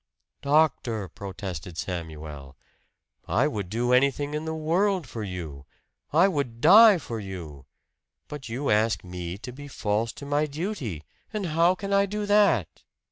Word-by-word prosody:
"Doctor," 140 -8 +2
protested 90 -2 -7
Samuel, 80 -6 -6 0.7
"I 130 +7 +2
would 105 -10 -4
do 120 +4 0
anything 140 +3 +2
in 150 +1 -3
the 160 0 -3
world 175 +3 +1
for 115 -3 -7
you 80 -8 -6 0.4
I 170 +6 +5
would 140 -10 -2
die 205 - +8
for 120 -8 -6
you. 85 -9 -8 0.6
But 145 -5 -8
you 130 +5 -1
ask 110 +2 +2
me 90 0 -6
to 120 +4 -8
be 145 +3 -10
false 110 -3 -1
to 140 - -10
my 145 +2 +1
duty; 145 - -4 0.3
and 210 -3 -3
how 170 +3 +4
can 195 +1 -4
I 200 0 +4
do 210 +1 -3
that?" 205 - +2
125 Hz, 150 wpm, -26 LUFS, -, 0.7 s, die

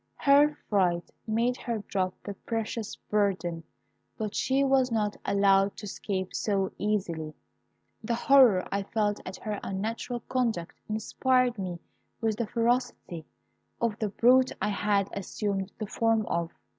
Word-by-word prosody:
Her 290 +2 +4
fright 180 -4 +1 0.2
made 235 +3 +1
her 230 -4 -3
drop 185 -2 -1
the 205 - -5
precious 225 +1 -4
burden, 185 -5 -1 0.5
but 215 -2 -3
she 270 +1 +1
was 265 -2 +3
not 210 -2 0
allowed 200 0 +3
to - - -9
escape 190 -2 -4
so 195 -3 0
easily; 170 -7 -2 0.7
the 235 +2 0
horror 240 -7 +5
I 200 - 0
felt 205 +1 -1
at 185 - -6
her 210 -2 -4
unnatural 225 +5 -3
conduct 230 -11 -1 0.2
inspired 245 +2 +1
me 180 -2 -3 0.4
with 220 -2 0
the 235 -2 -1
ferocity 235 - -1 0.5
of 230 -3 0
the 215 - 0
brute 255 +5 +4
I 210 - 0
had 200 -1 +1
assumed 195 0 -3
the 215 - -3
form 225 +1 +1
of. 170 -1 -1
210 Hz, 140 wpm, -28 LUFS, 195-235 Hz, 0.7 s, horror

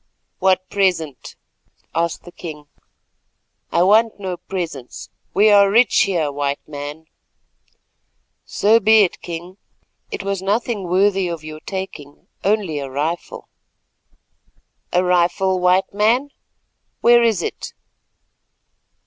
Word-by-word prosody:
"What 185 0 +2
present?" 170 - -1 0.6
asked 170 0 -1
the 175 - -12
king. 155 -4 -9 1.1
"I 170 - +3
want 215 +3 +3
no 185 -3 -4
presents. 165 -11 -6 0.2
We 210 +2 +5
are 200 -1 +6
rich 230 +4 +4
here, 170 -7 -1
White 140 0 -3
Man." 145 +1 -7 1.4
"So 220 +3 +3
be 220 0 +6
it, 185 - -2
King. 175 +2 -7 0.5
It - - -5
was 195 -1 -2
nothing 205 +1 -1
worthy 190 +1 +2
of 170 -3 -5
your 155 0 -8
taking, 170 -7 -7 0.2
only 195 -7 0
a 140 -1 -5
rifle." 155 +6 -4 1.4
"A 180 +1 +2
rifle, 180 +1 +2
White 180 +2 +2
Man? 230 +7 +2 0.7
Where 240 0 +6
is 220 -7 +2
it?" - - -6
185 Hz, 115 wpm, -20 LUFS, 165-200 Hz, 1.4 s, are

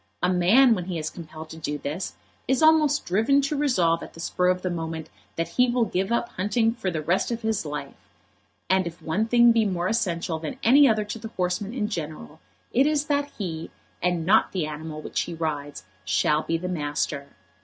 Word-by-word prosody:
A 180 +1 +3
man, 225 +9 +5
when 180 -5 -3
he 180 -2 -3
is 155 -1 -3
compelled 160 -1 -10
to 160 - -9
do 150 -2 -3
this, 155 +6 -4 0.3
is 265 +4 +2
almost 305 -2 +4
driven 225 +10 +3
to 280 +2 -1
resolve 185 - +2
at - - -10
the - - -12
spur 180 +1 0
of 185 0 +1
the 185 - -1
moment 160 -2 -5 0.2
that 165 - -2
he 250 0 +3
will 240 -1 +2
give 190 +1 -2
up 235 0 0
hunting 225 +4 +1
for 225 -6 -3
the 160 -3 -3
rest 175 +5 +1
of 235 -1 -4
his 220 -7 -1
life. 145 -2 -5 0.7
And 190 -1 +2
if 170 +1 -8
one 170 +7 -1
thing 240 0 +6
be 230 -1 +3
more 180 -3 -1
essential 170 -6 -1
than 160 +10 -5
any 275 +4 +7
other 215 -1 +1
to 210 +2 -6
the 225 - -6
horseman 190 +2 -2
in 215 -5 -1
general, 160 -5 -6 0.3
it 265 +4 +4
is 300 -1 +1
that 285 -1 0
he, 165 -5 -4 0.3
and 175 -2 0
not 210 +5 +4
the 180 -5 0
animal 155 0 -6
which - - -2
he 170 - -5
rides, 145 - -4 0.2
shall 150 +10 +2
be 165 - -1
the 180 +2 -5
master. 145 -4 -3
180 Hz, 210 wpm, -25 LUFS, 160-230 Hz, 0.7 s, any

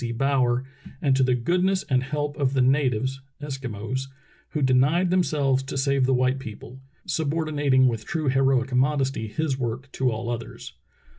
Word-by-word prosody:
C. 120 - -2
Brower, 125 0 +1 0.3
and 135 -2 +2
to 135 - +2
"the 130 -1 +3
goodness 180 +9 +1
and 130 -3 +1
help 145 +2 -3
of 135 -2 0
the 135 - +2
natives 130 -1 +1 0.2
[Eskimos], 130 -3 -4 0.4
who 150 -3 -2
denied 140 +8 +3
themselves 145 -7 +2
to 135 0 -6
save 135 -1 +2
the 135 - +2
white 130 +1 +1
people," 120 +1 -9 0.3
subordinating 145 -4 +1
with 115 -3 -1
true 155 +4 -3
heroic 135 -1 +2
modesty 135 -3 +1
his 135 +3 -2
work 130 +3 -4
to 130 -1 0
all 115 +2 -3
others. 115 -1 -7
135 Hz, 160 wpm, -25 LUFS, 125-145 Hz, 0.4 s, the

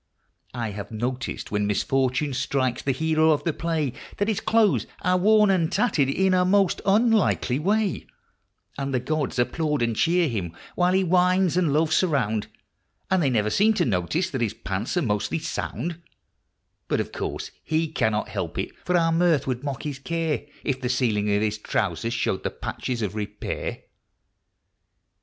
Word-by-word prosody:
I 115 -3 -2
have 100 0 -7
noticed 125 +4 -4
when 105 0 0
misfortune 130 +6 0
strikes 130 -1 0
the 135 - 0
hero 160 +3 +2
of 150 -2 +2
the 165 - 0
play 160 -6 -1 0.2
That 205 +2 0
his 215 - 0
clothes 220 -3 +2 0.2
are 180 0 +3
worn 210 +2 +5
and 175 -3 +1
tattered 190 - +2
in 190 +6 +2
a 180 0 +4
most 195 0 +2
unlikely 210 - +3
way; 200 +2 0 0.7
And 135 -1 -2
the - - +2
gods 150 +3 -2
applaud 150 +2 0
and 115 -1 0
cheer 170 +6 +3
him 95 - -4 0.2
while 180 0 +2
he 190 0 +3
whines 180 0 +3
and 175 -5 +2
loafs 155 +2 +3
around, 125 - 0 0.6
But 190 - +4
they 155 -7 +2
never 105 -4 +1
seem 215 - +3
to - - +2
notice 110 - 0
that 130 -4 -3
his 110 -1 -1
pants 105 - -3
are 175 - +2
mostly 105 +4 0
sound; 170 +1 -4 0.9
Yet, - - +1
of - - -3
course, - - -4
he 160 +1 0
cannot 110 -8 0
help - - -4
it, - - -2
for 180 0 +2
our 165 -1 +2
mirth 165 -3 +3
would 130 0 -3
mock 140 -2 -4
his 145 -3 -4
care 165 -1 -2 0.2
If 130 -2 -1
the 125 - -1
ceiling 110 -5 +1
of 105 - +1
his 105 0 -1
trousers 105 +2 -1
showed 95 -4 -1
the - - -1
patches 120 -3 -4
of 100 -2 -2
repair. 105 -1 -4
145 Hz, 175 wpm, -25 LUFS, 120-180 Hz, 0.9 s, worn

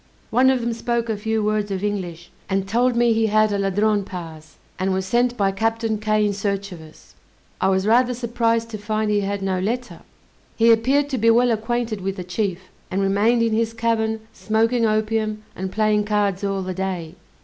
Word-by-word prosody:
One 255 +3 +4
of 260 -2 +2
them 235 0 -1
spoke 235 0 -2
a 220 - 0
few 220 +1 -1
words 210 0 0
of 195 0 -3
English, 175 -5 -4 0.2
and 195 0 0
told 240 +4 +2
me 235 -1 +3
he 225 0 +2
had 215 0 +3
a 200 - 0
Ladrone 205 +1 +1
pass, 165 -5 -9 0.2
and 190 +1 0
was 190 0 -1
sent 240 +4 +1
by 195 -1 +2
Captain 225 +2 -1
Kay 215 0 +1
in 205 - 0
search 200 0 -2
of 170 -3 -9
us; 155 0 -16 0.5
I - - +3
was 190 0 +1
rather 245 +3 +3
surprised 230 -1 0
to 215 - -5
find 215 +1 -1
he 205 - +2
had 200 0 -2
no 190 -1 0
letter. 240 +6 -3 0.6
He 230 0 +5
appeared 265 +6 +3
to 260 -3 -2
be 230 +2 +4
well 240 +1 +4
acquainted 225 -1 -2
with 195 +1 -2
the 185 - -5
chief, 185 0 -2 0.3
and 190 - -1
remained 205 +5 +2
in 225 -1 +1
his 225 +1 0
cabin 220 -1 0
smoking 225 +2 +1
opium, 215 0 -1
and 190 0 -4
playing 215 0 +1
cards 205 -2 0
all 195 -1 -1
the 185 0 -4
day. 180 -3 -4
215 Hz, 205 wpm, -22 LUFS, 195-230 Hz, 0.6 s, He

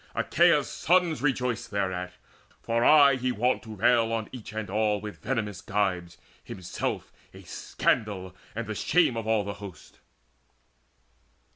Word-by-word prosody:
Achaea's - - +3
sons 175 -2 +1
Rejoiced 125 -4 -1
thereat, 95 -3 -2 0.5
for 115 +1 0
aye 140 -2 +7
he 130 0 -1
wont 125 +2 +1
to 110 -2 -9
rail 115 +2 +3
On 115 -2 -2
each 125 -4 -9
and 110 -1 -4
all 105 +1 +1
with 105 0 -8
venomous 110 -5 -2
gibes, 95 -4 -1 0.3
himself 95 -2 -5 0.2
A - - -12
scandal 95 -4 -2 0.2
and 115 +1 -3
the 110 - -4
shame 160 +3 +2
of 115 -1 -4
all 110 -2 +2
the 100 0 -4
host. 95 -6 -11
110 Hz, 140 wpm, -27 LUFS, 100-125 Hz, 0.5 s, aye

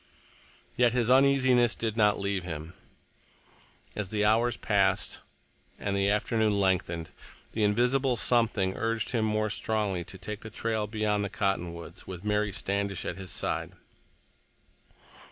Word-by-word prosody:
Yet 120 -1 +3
his 125 -1 +2
uneasiness 130 -3 +4
did 110 -2 -2
not 105 -2 +3
leave 100 -2 -1
him. 80 -1 -6 1.2
As 105 -3 -3
the 105 0 0
hours 115 +3 +3
passed 100 -2 +1 0.6
and 100 -1 -2
the 100 0 +2
afternoon 105 0 +1
lengthened, 90 -4 0 0.4
the 110 - -3
invisible 125 +5 +2
something 110 -6 +2
urged 115 -1 -1
him 115 -3 +1
more 110 0 0
strongly 105 -5 -1
to 95 - -10
take 105 +3 -6
the 110 - -8
trail 110 -1 -2
beyond 105 -1 0
the 100 - -2
cottonwoods, 95 -5 -3
with 95 +1 -8
Mary 105 0 +1
Standish 100 -1 -2
at 90 - -4
his 95 -1 -7
side. - - -2
105 Hz, 135 wpm, -28 LUFS, 95-115 Hz, 1.2 s, uneasiness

